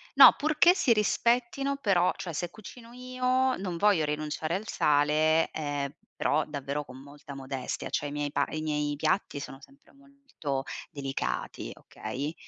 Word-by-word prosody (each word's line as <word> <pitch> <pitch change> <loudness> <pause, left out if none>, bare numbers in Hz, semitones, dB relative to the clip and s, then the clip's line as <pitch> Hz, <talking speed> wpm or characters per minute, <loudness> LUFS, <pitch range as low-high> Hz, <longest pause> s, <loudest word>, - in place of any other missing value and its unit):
no - - +10
purché 310 +4 +4
si 265 - +2
rispettino 240 +5 +1
però 195 -9 +3
cioè 170 - -5
se 175 +3 -3
cucino 230 +4 -12
io 255 +1 0
non 180 -3 -4
voglio 195 -4 +3
rinunciare 155 +2 -2
al 215 +4 -4
sale, 155 0 +3
ehm, 145 -2 -3 0.2
però 150 +1 +1
davvero 145 0 -4
con 130 -2 -12
molta 145 0 -11
modestia, 135 -1 -5
cioè 145 - -1
i - - -8
miei 145 0 -2
pa - - +1
i 155 - -4
miei 150 -1 -1
piatti 155 0 0
sono 135 -1 -8
sempre 275 0 -19
molto 275 - -6 0.3
delicati, 135 -3 -4
okay? 135 +8 -6
155 Hz, 155 wpm, -28 LUFS, 145-235 Hz, 0.3 s, no